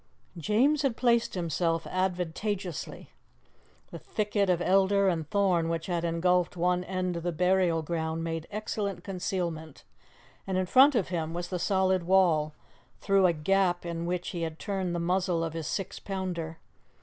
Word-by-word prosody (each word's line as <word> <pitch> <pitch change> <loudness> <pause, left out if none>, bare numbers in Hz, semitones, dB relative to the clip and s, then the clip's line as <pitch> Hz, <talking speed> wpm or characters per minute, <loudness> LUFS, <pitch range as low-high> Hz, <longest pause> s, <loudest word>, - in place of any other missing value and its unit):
James 230 - +2
had 270 -5 0
placed 235 -3 +2
himself 165 -1 -1
advantageously. 185 -1 -3 0.8
The - - -7
thicket 205 -2 -1
of 180 -2 +3
elder 195 +2 +3
and 165 -4 -1
thorn 185 -5 +2
which 165 -1 -2
had 175 -2 -2
engulfed 175 +1 +1
one 180 +1 +1
end 185 -2 -2
of - - -4
the 175 +1 -1
burial 180 -1 +2
ground 160 0 -2
made 165 0 -4
excellent 200 -3 -3
concealment, 175 -5 -4 0.6
and 190 -1 -1
in 185 - +1
front 265 +8 +6
of 205 -7 +1
him 165 -2 -3
was 175 0 -4
the 180 - -3
solid 190 0 +2
wall, 170 -4 +3 0.4
through 195 -2 +3
a - - +4
gap 175 +2 +1
in 170 0 -3
which 180 0 -2
he 175 -3 -5
had 160 -1 -3
turned 190 -3 -2
the - - -1
muzzle 180 0 0
of 165 -1 -3
his 165 -2 -4
six 195 +2 -4
pounder. 180 -4 -4
180 Hz, 160 wpm, -28 LUFS, 165-195 Hz, 0.8 s, front